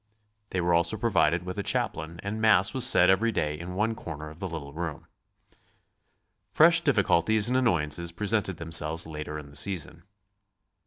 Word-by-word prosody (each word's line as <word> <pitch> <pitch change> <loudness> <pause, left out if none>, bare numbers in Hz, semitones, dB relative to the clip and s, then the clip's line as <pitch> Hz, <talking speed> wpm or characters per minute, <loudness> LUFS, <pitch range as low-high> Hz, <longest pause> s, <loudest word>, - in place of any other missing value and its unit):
They 90 - -2
were 85 0 +1
also 85 +6 +2
provided 90 -7 +1
with 90 +2 -6
a - - 0
chaplain 85 -4 -2
and 105 +2 -4
Mass 110 -2 +3
was 130 -2 +5
said 90 - +5
every 110 +5 +1
day 75 -7 -2
in 90 +2 -7
one 110 +3 0
corner 75 -7 -8
of 80 - -15
the 95 - -4
little 75 -4 -8
room. 80 -2 -6 1.5
Fresh 170 +2 +5
difficulties 110 - +2
and 125 - 0
annoyances 85 - 0
presented 100 0 0
themselves 80 0 0
later 75 -1 -7
in 70 -2 -10
the - - -14
season. 85 0 -4
85 Hz, 165 wpm, -27 LUFS, 80-105 Hz, 1.5 s, was